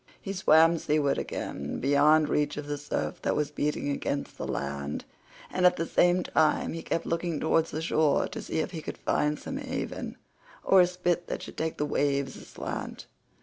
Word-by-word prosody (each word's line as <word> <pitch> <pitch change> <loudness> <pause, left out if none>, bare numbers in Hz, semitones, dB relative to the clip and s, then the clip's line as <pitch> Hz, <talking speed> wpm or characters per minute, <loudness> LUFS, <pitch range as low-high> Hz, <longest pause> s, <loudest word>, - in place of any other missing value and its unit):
He 195 - -5
swam 165 -2 +5
seaward 150 -2 +1
again, - - -4
beyond 145 +3 +4
reach 150 0 0
of 150 - -4
the 145 0 -3
surf 145 - -3
that - - 0
was 150 -1 -1
beating 150 -1 -1
against 140 0 -3
the - - -5
land, 70 +1 -3 0.5
and 185 - 0
at 180 0 +6
the 165 - -2
same 175 +2 +3
time 155 -1 +2
he 165 - -5
kept 165 - -2
looking 165 -2 -1
towards 165 0 +2
the 155 +2 -4
shore 155 -3 +2
to - - -6
see 160 - -2
if - - -4
he 165 -4 -5
could - - -6
find 150 0 0
some 270 - -6
haven, 265 -2 -4 0.5
or 190 -1 +6
a 175 - +5
spit 175 -1 -1
that - - -4
should - - -9
take 160 0 -2
the 150 - 0
waves 140 -2 0
aslant. - - -6
155 Hz, 190 wpm, -28 LUFS, 145-175 Hz, 0.5 s, at